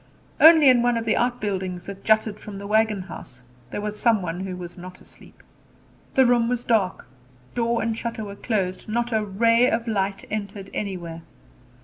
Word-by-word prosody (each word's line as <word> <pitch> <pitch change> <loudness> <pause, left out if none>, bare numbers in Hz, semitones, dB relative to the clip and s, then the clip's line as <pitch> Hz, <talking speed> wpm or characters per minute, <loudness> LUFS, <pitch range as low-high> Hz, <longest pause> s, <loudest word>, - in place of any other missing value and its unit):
Only 315 -2 +8
in 250 -2 +6
one 240 -1 +2
of 230 - -3
the 220 - +2
outbuildings 195 -7 -2
that 200 0 -9
jutted 215 -1 +2
from 205 -2 -9
the 200 - -8
wagon 215 -1 +1
house 125 -8 -11 0.3
there 205 - -4
was 210 0 -4
some 225 -5 +3
one 170 0 -4
who 190 -1 -5
was 175 -1 -8
not 185 0 -11
asleep. - - -17 0.7
The 265 - +6
room 240 -1 +3
was 245 -1 -1
dark; 210 -7 0 0.5
door 235 -1 0
and 225 0 -1
shutter 230 -1 -4
were 200 0 -8
closed; 200 -3 -2
not 240 +2 -1
a 220 -1 +1
ray 230 +5 +3
of 230 +1 -1
light 195 -2 -1
entered 200 -2 -5
anywhere. 175 -5 -5
215 Hz, 180 wpm, -24 LUFS, 190-235 Hz, 0.7 s, Only